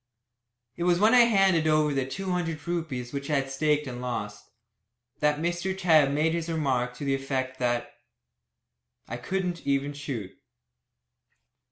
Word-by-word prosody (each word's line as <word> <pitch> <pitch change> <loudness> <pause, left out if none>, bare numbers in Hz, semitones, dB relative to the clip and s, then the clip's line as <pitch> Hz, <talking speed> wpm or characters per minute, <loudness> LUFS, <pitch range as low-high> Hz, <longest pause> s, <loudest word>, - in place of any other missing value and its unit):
It 170 - -2
was 175 -1 +4
when 215 +3 +5
I 245 -1 +8
handed 195 -7 +3
over 155 -1 +3
the 135 -1 -1
two 190 +7 -4
hundred 165 -4 -3
rupees 150 -8 -3
which 140 +1 -4
I 150 - +2
had 135 -1 -1
staked 150 +1 +1
and 125 -2 -6
lost, 105 -4 -5 0.7
that 150 0 +2
Mr. 175 +4 -2
Tebb 160 -6 +4
made 155 +3 +1
his 170 0 -2
remark 130 -6 0
to 140 - -6
the 135 - +1
effect 130 -1 -3
that 120 -1 -1 1.1
"I 120 - -5
couldn't 180 +5 -3
even 140 +1 0
shoot." 135 -9 -5
150 Hz, 155 wpm, -27 LUFS, 135-170 Hz, 1.1 s, I